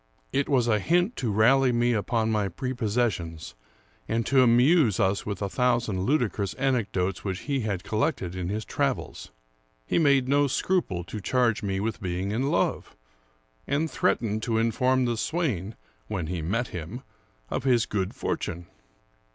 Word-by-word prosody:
It 140 0 0
was 125 -4 +3
a 110 -2 +3
hint 175 - +1
to 120 -5 -1
rally 125 +5 +4
me 120 0 +2
upon 110 +1 0
my 105 -3 0
prepossessions, 105 - -2 0.5
and 115 0 0
to 135 0 +4
amuse 125 - +4
us 95 +2 +1
with 100 0 -3
a - - 0
thousand 120 -4 0
ludicrous 120 -8 0
anecdotes 105 -9 -1
which 95 0 -3
he 140 -2 -1
had 100 -6 -2
col 105 +2 -3
lected 130 - -1
in 90 -1 -3
his 110 +2 -3
travels. - - -2 0.6
He - - +1
made 140 -5 +3
no 145 +1 +3
scruple 135 - 0
to 105 +5 -7
charge 120 0 +1
me 95 -2 -2
with 115 +3 -3
being 95 +1 -2
in 130 +6 0
love; - - -1 0.7
and 150 +2 0
threatened 110 -4 0
to 115 0 0
inform 125 +3 +2
the 120 -1 -1
swain, 115 - -2 0.3
when 90 -4 -3
he 85 +1 -3
met 115 +9 -1
him, 90 - -7 0.5
of - - -2
his 125 -4 +3
good 95 -2 -2
fortune. 85 +1 -3
115 Hz, 160 wpm, -26 LUFS, 100-130 Hz, 0.7 s, rally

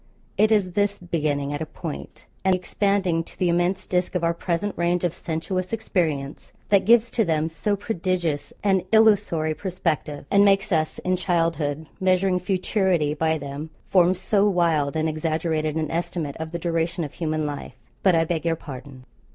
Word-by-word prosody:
It 215 +2 +3
is 200 -4 +3
this 205 +2 +1
beginning 150 -5 -1
at 145 - -4
a - - -1
point, 70 - -8 0.2
and 190 -1 +4
expanding 185 -2 0
to - - -15
the 180 - +1
immense 175 +2 +1
disk 180 0 -1
of 180 - 0
our 170 0 +2
present 175 +4 -2
range 175 +1 0
of 175 -2 +1
sensuous 180 +3 -3
experience, 160 -10 -2 0.2
that 200 -2 +4
gives 235 +1 +5
to 230 - +2
them 160 -3 0
so 205 +5 -1
prodigious 185 -6 -2
an 195 -2 +3
illusory 205 -8 +4
perspective, 160 -4 -3
and 200 0 +6
makes 195 0 +3
us 155 -2 +1
in 185 0 +2
childhood, 165 -4 0
measuring 185 -1 +2
futurity 185 -4 +1
by 160 +1 +1
them, 145 +2 -6 0.2
form 180 -1 +4
so 200 +2 +2
wild 165 -6 +1
and 160 0 +1
exaggerated 155 0 -1
an 160 -1 -2
estimate 170 -3 -3
of 160 0 -5
the 170 - -4
duration 170 0 -1
of 145 - -6
human 155 -2 -2
life. 145 -2 -5 0.3
But, 190 -3 +4
I 165 0 +3
beg 165 -1 -2
your 165 -1 +1
pardon. 130 -3 -10
170 Hz, 175 wpm, -24 LUFS, 155-190 Hz, 0.3 s, and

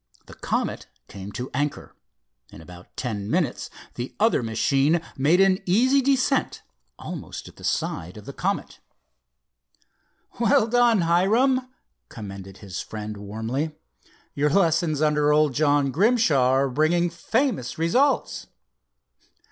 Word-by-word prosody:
The - - -13
Comet - - -3 0.2
came 100 0 -9
to 125 +1 -6
anchor. 145 +3 -3 0.5
In - - -13
about 90 +2 -13
ten 105 -5 -4
minutes 160 -6 -1 0.2
the 120 +1 -6
other 220 - +3
machine 135 +8 +1 0.2
made 150 +7 +3
an 195 -1 +4
easy 255 +9 +4
descent 270 0 0 0.3
almost - - -8
at - - -15
the - - -14
side 90 +5 -2
of 105 - -11
the - - -8
Comet. - - -3 1.6
"Well 240 0 +4
done, 235 -3 +3
Hiram," 225 +10 +2 0.4
commended 100 -3 -9
his 95 -3 -6
friend, 105 0 -7
warmly. 110 +9 -4 0.6
"Your 145 +1 +1
lessons 165 -3 +2
under 150 -1 +2
old 150 -2 +3
John 145 0 +2
Grimshaw 175 - +3
are 135 +1 +2
bringing 165 +5 +1
famous 215 - -1
results." 250 - +1
150 Hz, 125 wpm, -24 LUFS, 125-200 Hz, 1.6 s, an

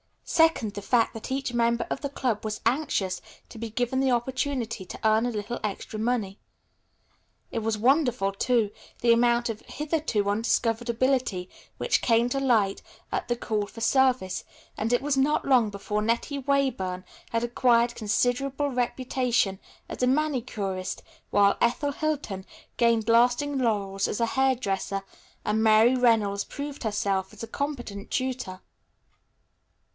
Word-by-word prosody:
Second 320 -10 +3
the 205 - -6
fact 230 +2 +2
that 225 +3 -7
each 265 -2 -2
member 235 0 +1
of - - -1
the 280 - -2
club 250 -6 -1
was 215 -1 -4
anxious 230 -7 0 0.3
to 225 - -10
be 230 0 -4
given 245 +3 -1
the 270 0 +2
opportunity 250 -3 -1
to - - -9
earn 220 +1 +3
a - - 0
little 220 +1 -4
extra 215 +1 -4
money. 220 -4 -1 1.1
It - - -1
was 220 -1 -1
wonderful, 245 -4 +2
too, 220 +1 +1 0.3
the 235 - +4
amount 235 0 +3
of 220 -1 -4
hitherto 295 -9 -1
undiscovered 230 +2 0
ability 235 -7 0 0.3
which 455 -2 +1
came 235 0 +3
to 275 - -1
light 225 -7 +2 0.3
at - - -2
the 240 - +1
call 215 -3 -2
for 230 - -11
service, 250 -6 +2 0.3
and 220 +2 -2
it 245 - +2
was 290 -1 0
not 285 +3 +2
long 250 -5 +4
before 210 +1 -3
Nettie 235 +6 -1
Weyburn 255 -10 0 0.3
had 230 0 -1
acquired 240 0 +3
considerable 250 +6 0
reputation 245 -5 0 0.3
as - - -6
a 250 - +3
manicurist, 245 -10 -1 0.3
while 200 -1 +4
Ethel 250 +5 +2
Hilton 280 -11 -3 0.3
gained 230 -2 +3
lasting 245 +5 +3
laurels 200 -5 0
as - - -3
a - - +4
hair 265 +2 +2
dresser 195 -3 -2 0.4
and 215 +1 +1
Mary 220 +2 +6
Reynolds 220 -5 +2
proved 285 -1 -6
herself 200 -3 -1
a - - -4
competent 240 -9 -4
tutor. 255 -8 -3
235 Hz, 150 wpm, -26 LUFS, 210-260 Hz, 1.1 s, Mary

